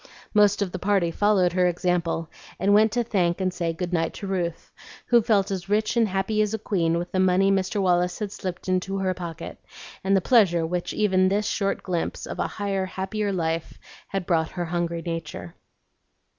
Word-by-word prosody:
Most 205 -1 +4
of 190 - -5
the 185 - -5
party 190 -3 +1
followed 190 -2 +2
her 180 0 +3
example, 175 -2 0 0.3
and 200 +1 +3
went 215 +1 +5
to 240 0 +1
thank 180 -6 0
and 185 -1 0
say 170 -2 -1
good 180 +1 -4
night 165 -1 0
to - - -6
Ruth, 175 -4 -3 0.3
who 240 -1 +5
felt 205 -4 +2
as 190 0 -4
rich 215 +2 +1
and 230 -2 +3
happy 195 +3 0
as 210 +1 0
a - - -2
queen 170 -6 0
with 175 +1 -4
the 185 - 0
money 185 +1 +4
Mr. 195 +1 0
Wallace 180 -1 +2
had 210 -2 -4
slipped 185 -3 -6
into 185 +1 0
her 190 -1 0
pocket, 170 -3 -7 0.4
and 195 +1 +3
the - - +4
pleasure 185 -7 +3
which 175 +1 -2
even 185 -3 +2
this 205 +2 0
short 195 -1 -1
glimpse 175 -3 -3
of - - -7
a - - +1
higher, 195 -2 -2
happier 200 +2 -2
life 165 -3 -2 0.3
had 195 -2 -3
brought 160 -3 +1
her 175 -2 -4
hungry 170 0 -2
nature. 165 - -5
185 Hz, 200 wpm, -25 LUFS, 175-200 Hz, 0.4 s, went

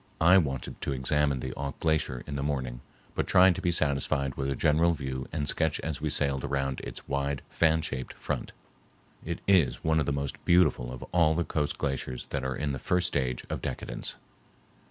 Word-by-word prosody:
I 90 +4 +7
wanted 65 -6 -3
to 70 - -1
examine 70 0 +1
the 65 0 -4
Auk 70 -1 -5
Glacier 75 -6 0
in 70 - -5
the 70 - -2
morning, 65 -4 -2 0.3
but - - -1
tried 95 0 +6
to - - -5
be 90 - +1
satisfied 70 -3 +1
with 70 +1 -2
a 70 - 0
general 80 +5 +3
view 65 -3 -4
and 75 -2 -2
sketch 80 -1 +1
as 80 -3 -3
we 80 - 0
sailed 70 -3 0
around 70 -1 -1
its - - -8
wide 70 -1 -1
fan 80 -1 +3
shaped 65 -4 -4
front. - - -4 0.7
It 85 +1 -4
is 95 -8 +3
one 80 0 +3
of 75 - 0
the - - +2
most 70 -1 -3
beautiful 85 -8 +3
of 65 - -7
all 85 -3 +4
the 85 - +1
coast 75 -3 -1
glaciers 65 -2 -3
that 70 -2 -2
are 65 0 -2
in 75 -1 -1
the 65 - -3
first 90 +5 +1
stage 65 -3 -1
of - - -4
decadence. - - -4
70 Hz, 200 wpm, -29 LUFS, 65-80 Hz, 0.7 s, I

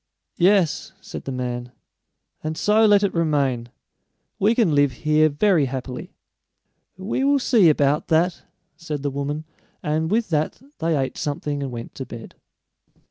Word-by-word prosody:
"Yes," 185 -3 +2
said - - -9
the 135 - -4
man; 125 -1 -4 0.7
"and 155 0 -3
so 215 +1 +4
let 205 -1 +5
it 200 - +1
remain. 140 -7 0 0.7
We 215 +4 +3
can 215 -10 +3
live 145 -2 +3
here 155 0 +4
very 160 0 +3
happily." 130 -1 -6 0.8
"We 200 +7 -2
will 280 +1 +4
see 230 -9 +4
about 145 0 +2
that," 170 +2 +2 0.3
said 155 -3 -5
the 145 - -1
woman, 140 +2 -3 0.4
and 155 +2 0
with 225 +3 +1
that 155 -2 -1 0.2
they 165 -2 +1
ate 135 -1 -2
something 145 -1 -3
and 135 -2 -4
went 115 -1 -7
to 130 - -7
bed. 115 -1 -9
155 Hz, 150 wpm, -23 LUFS, 140-185 Hz, 0.8 s, let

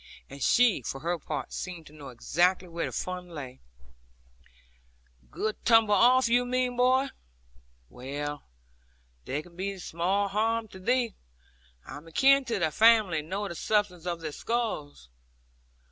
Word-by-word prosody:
And 140 0 -10
she, 235 - +4
for 135 +3 -5
her 170 +2 -1
part, 150 -4 -5
seemed 175 -3 -6
to 145 - -15
know 145 -3 -10
exactly 175 +9 +1
where 170 0 -3
the - - -6
fun 180 -1 -5
lay. 135 -6 -8 1.7
'Good 215 - -4
tumble 225 -3 +5
off, 245 +5 +5
you 245 +1 +3
mean, 250 0 0
my 245 - -10
boy. 255 +2 +3 0.8
Well, 145 - -6 0.8
there 145 +3 -3
can 170 0 -18
be 195 +2 -4
small 185 +3 -1
harm 220 +3 0
to 190 - -12
thee. 240 +2 +1 0.7
I - - -8
am 150 +3 -13
akin 270 +10 +4
to 230 -3 -1
thy 165 -4 0
family, 215 -5 +5
and 150 +1 -9
know 200 +2 -2
the 170 - -6
substance 180 -1 -1
of 170 -1 -3
their 155 -2 -4
skulls.' 180 - -3
185 Hz, 155 wpm, -28 LUFS, 155-230 Hz, 1.7 s, tumble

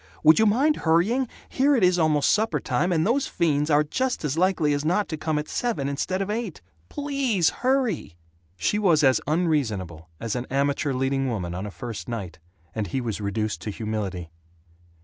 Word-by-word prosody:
Would 155 +4 +7
you 220 - +5
mind 275 +9 +3
hurrying? 195 +11 +2 0.2
Here 280 +2 +2
it 235 - +1
is 180 -1 +4
almost 155 -3 +3
suppertime, 210 -4 0
and 160 -2 +2
those 260 +6 +1
fiends 150 -2 0
are 150 0 +4
just 250 - -2
as 145 -1 -1
likely 170 -4 +2
as 145 0 -1
not 180 +6 +1
to 160 - -2
come 155 0 -2
at 150 - -3
seven 200 - -2
instead 185 +7 -1
of 200 - -4
eight. 215 -6 -3 0.3
PLEASE 275 - 0
hurry!" 255 - 0 0.4
She 210 - 0
was 170 -7 +3
as 130 -2 +4
unreasonable 110 - -1
as 115 -1 -3
an 125 0 -3
amateur 140 +1 0
leading 135 +1 0
woman 90 -7 -3
on 95 +4 -4
a - - -5
first 115 +2 -7
night, 95 -9 -5 0.3
and 110 -2 -2
he 110 - -2
was 115 -4 -3
reduced 100 -3 -2
to - - -5
humility. 100 -6 -4
150 Hz, 185 wpm, -25 LUFS, -, 0.4 s, Would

